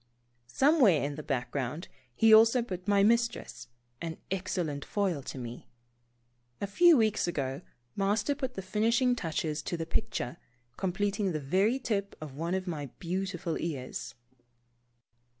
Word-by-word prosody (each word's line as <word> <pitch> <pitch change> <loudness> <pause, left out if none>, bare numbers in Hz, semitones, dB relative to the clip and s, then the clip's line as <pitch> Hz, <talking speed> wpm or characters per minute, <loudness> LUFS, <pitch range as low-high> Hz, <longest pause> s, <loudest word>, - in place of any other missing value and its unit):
Somewhere 255 - +4
in 145 +1 -2
the 155 - -6
background 135 +3 -3 0.3
he 225 -1 +6
also 230 +3 +7
put 185 -4 -6
my 200 -1 +4
mistress, 235 +2 +1 0.3
an 165 -1 -4
excellent 175 -6 -2
foil 190 -8 -1
to 135 - -7
me. 120 -1 -7 0.9
A - - -1
few 325 - +6
weeks 220 -5 +2
ago 140 -3 -2 0.3
Master 205 +7 +1
put 260 -3 -4
the 190 - -5
finishing 230 +6 +2
touches 160 -5 -2
to 170 - -3
the 165 - -3
picture, 220 - -2 0.4
completing 195 +2 -1
the 155 - -1
very 190 - +2
tip 200 -6 -2
of 155 -3 -8
one 165 +6 -2
of 190 -1 -2
my 155 -6 -4
beautiful 180 -1 -3
ears. 145 -7 -5
185 Hz, 140 wpm, -30 LUFS, 155-220 Hz, 0.9 s, also